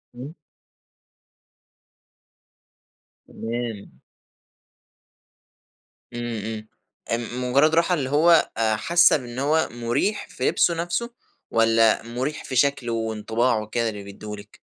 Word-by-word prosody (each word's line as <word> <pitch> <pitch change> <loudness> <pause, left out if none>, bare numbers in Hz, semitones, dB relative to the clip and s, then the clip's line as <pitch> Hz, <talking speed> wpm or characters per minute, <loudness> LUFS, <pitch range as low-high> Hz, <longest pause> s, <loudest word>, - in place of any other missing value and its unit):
إمم. 140 +7 -9 2.9
تمام. 115 - -6 2.1
امم، 120 -1 -4
امم، 110 -1 -6 0.4
آآ، 115 - +1
مجرد 125 +6 +1
راحة 170 +2 +3
اللي 135 -6 -1
هو 160 +3 +4
آآ، 110 -1 +2
حاسة 170 +8 +4
بإن 125 -1 -8
هو 155 +3 +1
مريح 120 - -1
في - - -1
لِبسه 170 - +2
نَفْسه، 175 +8 -2 0.4
والّا 115 0 +3
مريح 125 +6 -4
في 130 - -6
شكله 125 -3 +1
وانطباعه 110 +1 0
وكده 115 +2 -1
اللي 105 -2 -7
بيدّيه 105 +1 -8
لك؟ 100 0 -14
120 Hz, 105 wpm, -23 LUFS, 110-145 Hz, 2.9 s, هو